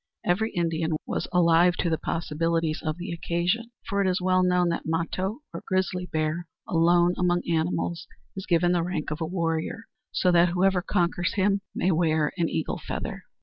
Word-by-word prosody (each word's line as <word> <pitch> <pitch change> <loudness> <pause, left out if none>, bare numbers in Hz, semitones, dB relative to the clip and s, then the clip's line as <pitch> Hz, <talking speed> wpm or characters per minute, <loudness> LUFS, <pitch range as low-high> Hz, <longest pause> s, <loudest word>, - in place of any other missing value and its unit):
Every 215 +6 +1
Indian 165 -2 0
was - - -3
alive 175 0 +4
to - - -1
the 160 - 0
possibilities 165 0 -1
of 155 0 -2
the 175 0 -5
occasion, 175 +7 -1 0.2
for 200 0 0
it 195 - +2
is 185 0 +1
well 185 0 +2
known 180 -1 +3
that 170 - -3
Mato, 185 - -2
or 170 - -6
grizzly 185 -1 -1
bear, 155 +2 -2 0.2
alone 175 +1 +4
among 175 -1 +2
animals 165 +1 -1 0.3
is 190 - -6
given 175 0 +3
the 175 -1 +2
rank 165 -3 -3
of 155 +2 -4
a 160 - -1
warrior, 165 +4 -2 0.3
so 180 - +2
that 175 0 +5
whoever 185 +1 +2
conquers 175 -2 0
him 200 0 +2
may 185 - +1
wear 160 -2 +2
an 170 -3 0
eagle 160 - -2
feather. - - -5
175 Hz, 180 wpm, -26 LUFS, 165-180 Hz, 0.3 s, that